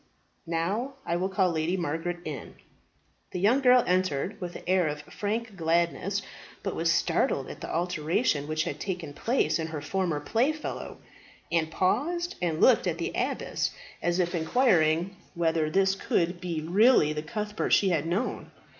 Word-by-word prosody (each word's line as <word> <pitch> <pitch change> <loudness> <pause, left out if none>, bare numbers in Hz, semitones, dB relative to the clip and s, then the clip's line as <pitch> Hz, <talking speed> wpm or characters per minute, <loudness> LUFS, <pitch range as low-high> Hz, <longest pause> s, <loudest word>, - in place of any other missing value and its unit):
Now 195 +11 -1
I 170 - 0
will 185 +2 0
call 190 -2 +2
Lady 165 +3 0
Margaret 170 +1 -2
in." 150 -3 -6 0.8
The 180 - -2
young 230 +9 +4
girl 250 -1 +6
entered 185 +2 0
with 175 -1 -5
an - - -8
air 185 -2 +3
of 150 0 -4
frank 215 +6 -3
gladness, 170 +4 0 0.4
but - - -2
was - - +2
startled - - +1
at - - -11
the - - -5
alteration 165 - 0
which 155 0 0
had - - -4
taken 175 -6 -4
place 165 - +1
in 160 - -2
her 155 -2 -5
former 170 0 -1
playfellow, 260 - -1 0.5
and 165 -1 +1
paused 340 - 0
and 165 -3 0
looked 245 -3 +5
at 170 -2 -1
the 170 - -2
abbess, - - -1 0.3
as 175 0 +1
if 175 -1 0
inquiring 175 -2 +2 0.2
whether 165 -2 +1
this 190 +3 +3
could 175 -2 -1
be 170 -3 -3
really 180 -1 +4
the 150 - -3
Cuthbert 210 +7 -3
she 195 - +5
had 165 -3 0
known. 190 +9 -2
175 Hz, 165 wpm, -28 LUFS, 160-200 Hz, 0.8 s, girl